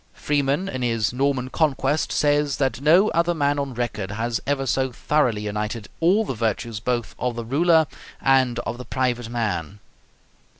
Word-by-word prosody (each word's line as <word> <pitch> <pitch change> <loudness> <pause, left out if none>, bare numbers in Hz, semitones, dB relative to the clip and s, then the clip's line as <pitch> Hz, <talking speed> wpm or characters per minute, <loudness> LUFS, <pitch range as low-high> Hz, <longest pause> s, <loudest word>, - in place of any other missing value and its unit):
Freeman 145 +4 0
in 130 -7 -4
his 115 -3 0
'Norman 130 -1 0
Conquest' 150 -1 +1
says 145 -1 +2
that 135 -1 -1
"no 175 +8 +5
other 170 +1 +1
man 145 -1 +1
on 140 -3 -3
record 110 -5 -3
has 115 +3 -2
ever 140 -1 0
so 130 0 0
thoroughly 125 -4 +1
united 105 +1 -4
all 190 +7 +3
the 135 - -3
virtues 110 -1 -2
both 120 +1 -2
of 125 -1 -1
the 120 -1 -5
ruler 160 +5 +4 0.3
and 130 -3 +3
of 120 - -4
the 125 - -7
private 125 -3 -1
man." 105 -6 -2
130 Hz, 165 wpm, -23 LUFS, 115-145 Hz, 0.3 s, no